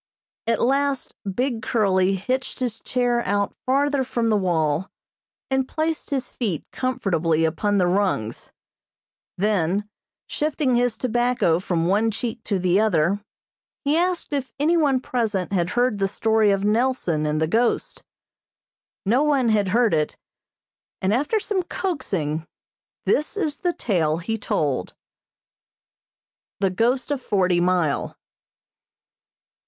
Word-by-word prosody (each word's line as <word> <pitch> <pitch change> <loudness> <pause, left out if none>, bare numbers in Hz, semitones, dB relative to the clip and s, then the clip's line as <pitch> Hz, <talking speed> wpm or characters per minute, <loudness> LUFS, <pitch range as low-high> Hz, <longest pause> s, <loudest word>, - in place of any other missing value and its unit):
At 230 -1 +2
last 275 +1 +1 0.2
Big 245 +2 -1
Curly 195 -4 +2
hitched 255 +10 -2
his 245 -4 -2
chair 245 -2 0
out 200 +1 0
farther 280 +1 +2
from 235 -2 -1
the - - +4
wall, 170 -3 0 0.6
and 265 -1 +1
placed 315 +2 -2
his 265 -3 -2
feet 200 - -3
comfortably 175 -11 0
upon 205 +6 0
the 185 - +3
rungs; 175 - -1 0.9
then, 200 0 +1 0.4
shifting 295 -3 0
his 245 -2 +1
tobacco 240 -8 +1
from 170 -3 -1
one 205 +5 +2
cheek 225 +1 -4
to 200 - 0
the 180 +1 +2
other, 200 -1 +2 0.6
he 290 +2 +2
asked 350 -2 0
if 275 -2 -2
any 315 +4 +3
one 285 -6 +3
present 220 -8 -1
had 175 -2 +1
heard 245 -4 +2
the 195 - +2
story 220 +1 +2
of 195 -1 +1
Nelson 210 -9 +1
and 150 0 0
the 160 - +2
ghost. 230 +8 0 1.0
No 235 +7 +3
one 280 -5 +2
had 210 -3 +2
heard 225 +1 +3
it, 155 -1 0 0.8
and, 190 +2 +1
after 295 - +1
some 405 -2 -1
coaxing, 190 - -3 0.6
this 300 +7 +1
is 310 -7 -1
the 355 - 0
tale 165 - 0
he 205 +7 -3
told. 140 - -1 1.6
The 195 -1 +1
Ghost 240 +7 +1
of 280 -3 -1
Forty 185 -6 +2
Mile. 175 -4 0
220 Hz, 130 wpm, -23 LUFS, 185-255 Hz, 1.6 s, the